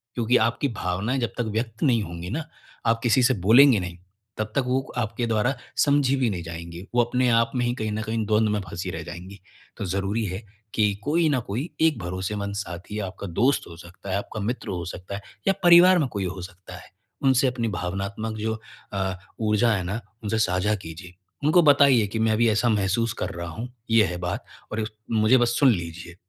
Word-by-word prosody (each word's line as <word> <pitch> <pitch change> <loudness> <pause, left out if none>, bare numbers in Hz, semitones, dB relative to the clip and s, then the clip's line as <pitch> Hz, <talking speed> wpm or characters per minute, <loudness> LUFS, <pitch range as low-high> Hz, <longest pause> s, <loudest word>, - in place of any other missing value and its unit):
क्योंकि 120 +1 +3
आपकी 115 +4 0
भावनाएँ 95 +9 -1
जब 120 -2 -2
तक 120 - 0
व्यक्त 110 +1 -3
नहीं 125 -6 +3
होंगी 85 -1 -7
ना, 150 +8 -3 0.4
आप 115 0 +2
किसी 125 +1 +4
से 130 - +4
बोलेंगे 125 0 +7
नहीं, 90 -1 -6 0.4
तब 110 0 -3
तक 140 - +2
वो 130 +1 +2 0.2
आपके 115 +1 -1
द्वारा 115 +3 +1 0.2
समझी 140 -2 +3
भी 130 -3 +1
नहीं 90 -4 -4
जाएँगी। 85 +1 -7
वो 120 - +6
अपने 125 +1 +1
आप 115 0 +3
में 125 -1 +1
ही 120 - +1
कहीं 110 -3 -3
न 105 +1 -2
कहीं 110 0 -2
द्वंद 110 +1 +2
में 105 0 0
फंसी 85 +1 -5
रह 80 -2 -5
जाएँगी। 90 +4 -9 0.4
तो 100 - -3
ज़रूरी 100 +4 -1
है 95 +1 -4 0.3
कि 105 -2 +2
कोई 160 +3 +2
ना 140 -3 +2
कोई 120 - -4
एक 160 -4 +4
भरोसेमंद 95 +3 -3
साथी 95 +1 -6
आपका 95 0 -5
दोस्त 120 +11 +1
हो 85 - -10
सकता 90 +3 -11
है, 95 - +1
आपका 105 +2 -5
मित्र 115 +5 -3
हो 90 -3 -3
सकता 90 +3 -7
है 100 - -6 0.3
या 195 - +5
परिवार 175 +1 +8
में 145 - +1
कोई 100 -2 -2
हो 95 +1 -5
सकता 95 0 -10
है। - - -14 0.3
उनसे 135 0 +4
अपनी 125 -2 -1
भावनात्मक, 100 +4 -3
जो 110 +1 -2 0.3
अ, 95 -1 -1 0.3
ऊर्जा 110 +1 +2
है 95 - -2
ना, 100 +6 -3 0.2
उनसे 110 +1 -1
साझा 100 +1 +1
कीजिए। 90 -1 -9 0.3
उनको 160 +4 +5
बताइए 140 -6 +5
कि, 110 +3 -4
"मैं 110 0 +2
अभी 115 +2 +3
ऐसा 110 +3 +2
महसूस 105 +2 +1
कर - - -3
रहा 85 0 -5
हूँ। 115 +10 -6 0.2
ये 115 -1 +6
है 90 -1 -4
बात 95 +8 -3 0.3
और 110 0 -1 0.3
मुझे 110 +3 +4
बस 120 0 +2
सुन 135 -3 +6
लीजिए।" 85 -2 -5
110 Hz, 210 wpm, -25 LUFS, 95-120 Hz, 0.4 s, परिवार